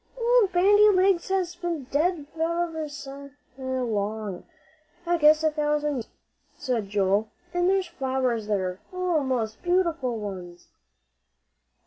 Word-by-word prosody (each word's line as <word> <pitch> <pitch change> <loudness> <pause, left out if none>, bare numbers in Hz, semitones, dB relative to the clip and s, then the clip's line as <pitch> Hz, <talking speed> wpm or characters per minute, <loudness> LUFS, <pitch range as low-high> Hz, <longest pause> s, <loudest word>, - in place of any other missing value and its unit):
"Old 475 -4 +3
Bandy 410 +4 +6
Legs 375 -2 +3
has 370 -2 0
been 345 -4 -3
dead 310 +1 +1
ever'n 335 +2 0
ever 310 -1 -3
so 280 -1 -9 0.3
long. 220 -7 -3 0.6
I 345 0 +2
guess 305 +1 +5
a 315 - +3
thousand 295 -1 0
years," 230 - -5 0.5
said 240 -8 -2
Joel; 200 +1 +1 0.2
"an' 355 0 +2
there's 385 0 +2
flowers 260 -7 -2
there 190 -3 -1
oh, 365 -4 0
most 235 -5 -2
beautiful 335 -9 0
ones!" 180 -4 -8
295 Hz, 125 wpm, -26 LUFS, 225-350 Hz, 0.6 s, Bandy